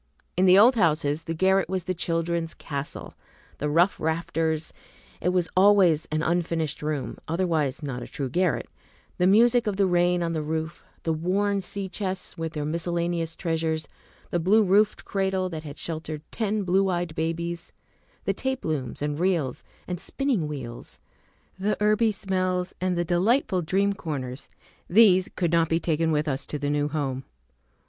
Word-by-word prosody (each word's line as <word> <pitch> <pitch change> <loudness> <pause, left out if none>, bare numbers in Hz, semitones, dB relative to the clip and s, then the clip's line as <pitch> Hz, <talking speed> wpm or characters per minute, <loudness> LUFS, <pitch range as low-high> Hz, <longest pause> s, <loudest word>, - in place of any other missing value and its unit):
In 185 - +3
the 185 +1 +7
old 235 +6 +8
houses 155 - +1
the 165 - -3
garret 190 +2 +2
was 185 -1 -1
the 185 - -2
children's 165 -1 -1
castle. 140 -1 -6 0.5
The 150 - -1
rough 170 +6 +3
rafters, 160 -1 -1 0.5
it 180 - +1
was 180 -2 +1
always 185 -5 +5
ail 155 +1 0
unfinished 165 -3 -1
room, 150 -3 -3
otherwise 160 -4 0
not 130 -4 -4
a - - -7
true 140 - -4
garret, 180 +7 0 0.5
the 180 - +4
music 235 +4 +5
of 200 -2 -1
the 200 - +4
rain 175 -1 +2
on 165 - -1
the 160 -2 -1
roof, 160 +2 -4 0.2
the 165 - 0
worn 195 +5 0
sea 195 +1 -5
chests 190 -1 -4
with 165 -2 -4
their 150 -2 -3
miscellaneous 170 +1 -2
treasures, 160 -2 -1 0.4
the 175 - +1
blue 205 +6 +4
roofed 205 +2 +3
cradle 190 -1 0
that 160 -3 -5
had 145 -2 -9
sheltered 155 -2 -5
ten 215 -2 -1
blue 190 +1 +2
eyed 175 -2 -1
babies, 170 +2 -3 0.5
the - - +1
tape 265 0 -3
looms 145 -4 -2
and 150 0 -2
reels 170 -8 0 0.2
and 180 -1 -3
spinning 260 - -1
wheels, 130 -6 -7 0.6
the 205 +2 0
herby 215 +2 +3
smells, 185 -2 -1
and 185 -1 0
the 175 - 0
delightful 185 - +2
dream 195 +4 +1
corners, 140 -8 -5 0.4
these 190 -2 +6
could 175 -3 0
not 165 -1 +3
be 165 - +2
taken 160 -1 0
with 150 0 +1
us 140 -1 -1
to 150 - -3
the 145 0 -1
new 145 0 +1
home. 135 -4 -2
170 Hz, 170 wpm, -26 LUFS, 155-190 Hz, 0.6 s, old